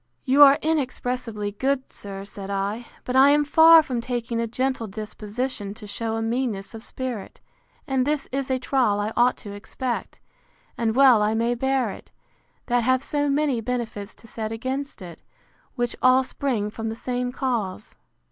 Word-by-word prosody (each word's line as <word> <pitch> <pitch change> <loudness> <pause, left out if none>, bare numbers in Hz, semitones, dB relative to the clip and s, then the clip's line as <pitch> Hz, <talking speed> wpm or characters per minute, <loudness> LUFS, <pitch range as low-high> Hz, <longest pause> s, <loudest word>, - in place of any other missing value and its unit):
You 270 +3 +4
are 280 -1 +9
inexpressibly 250 -8 -2
good, 265 +5 -2
sir, 195 -1 -7
said 200 -1 -8
I; 200 +4 -2 0.2
but 250 - -3
I 270 +2 +7
am 295 +1 +4
far 320 +2 +8
from 250 -5 -3
taking 235 -1 -3
a 230 - -1
gentle 255 0 -1
disposition 210 +1 -5
to 215 - -10
shew 220 +2 -3
a 225 - -2
meanness 225 -3 -2
of 225 0 -9
spirit: 250 -7 -5 0.5
And 265 -1 +1
this 295 +1 -1
is 270 0 -2
a 260 - +1
trial 250 -5 +1
I 210 +2 -2
ought 245 +1 +3
to 205 -2 -9
expect; 240 +4 -5 0.6
and 225 -1 0
well 260 -5 +6
I 210 +1 +1
may 230 +2 +1
bear 260 -2 0
it, - - -12 0.6
that 245 -1 +2
have 255 +2 +2
so 290 -1 0
many 280 -4 +1
benefits 225 -3 -4
to - - -17
set 220 -1 -5
against 260 +1 -4
it, 170 -2 -10 0.5
which 240 -2 -1
all 255 +1 +5
spring 240 -6 -2
from 225 +1 -4
the 220 - -4
same 245 +1 -2
cause. 230 -7 -3
240 Hz, 175 wpm, -24 LUFS, 215-265 Hz, 0.6 s, are